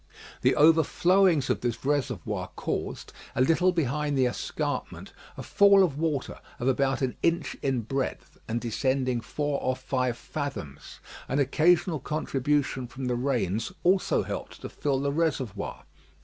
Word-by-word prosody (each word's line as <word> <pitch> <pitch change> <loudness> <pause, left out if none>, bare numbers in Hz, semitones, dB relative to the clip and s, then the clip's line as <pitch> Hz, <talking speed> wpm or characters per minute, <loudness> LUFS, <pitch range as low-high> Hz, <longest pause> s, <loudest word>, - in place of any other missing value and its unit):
The - - +3
overflowings 165 +1 +4
of - - -1
this 120 0 -3
reservoir 135 - -1
caused, - - -4 0.2
a 130 - +1
little 165 +7 +4
behind 150 -3 -1
the 130 - +4
escarpment, 125 - -3 0.2
a - - -6
fall 200 -1 +5
of 160 -7 0
water 155 -5 -2 0.2
of 120 - -3
about 135 +1 +1
an 130 - -1
inch 170 0 0
in 130 -3 0
breadth, 135 +4 -4
and 115 +2 -1
descending 130 +1 0
four 145 +3 -2
or 130 - 0
five 130 -2 -1
fathoms. 135 - -6 0.3
An 135 - -1
occasional 160 +3 +3
contribution 140 -2 -1
from 130 +2 -7
the 125 -1 0
rains 120 - -1
also 185 +2 +3
helped - - -6
to - - -6
fill 140 -2 -1
the 140 +1 0
reservoir. 135 -10 -2
135 Hz, 145 wpm, -27 LUFS, 125-155 Hz, 0.3 s, fall